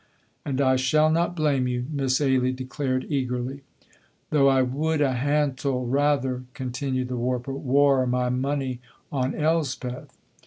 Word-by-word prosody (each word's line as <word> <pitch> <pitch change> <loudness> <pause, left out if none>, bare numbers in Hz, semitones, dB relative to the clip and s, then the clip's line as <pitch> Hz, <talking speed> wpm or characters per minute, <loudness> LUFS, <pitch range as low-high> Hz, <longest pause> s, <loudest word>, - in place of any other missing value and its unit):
"And 135 -2 -2
I 130 -1 +3
shall 155 +5 +3
not 170 +2 +1
blame 145 -5 +1
you," 125 0 -2
Miss 135 -3 +1
Ailie 130 -2 +2
declared 130 0 -3
eagerly. 130 -1 -2 0.7
"Though 140 -2 +4
I 135 -1 +4
would 150 +5 -1
a 140 -3 +2
hantle 135 -1 0
rather," 135 -1 +1
continued 130 0 -3
the 125 - -3
warper, 125 +2 -2
"waur 135 -1 +3
my 125 0 0
money 130 0 -1 0.3
on 130 -2 -1
Elspeth." 150 -5 -2
130 Hz, 140 wpm, -25 LUFS, 125-145 Hz, 0.7 s, Though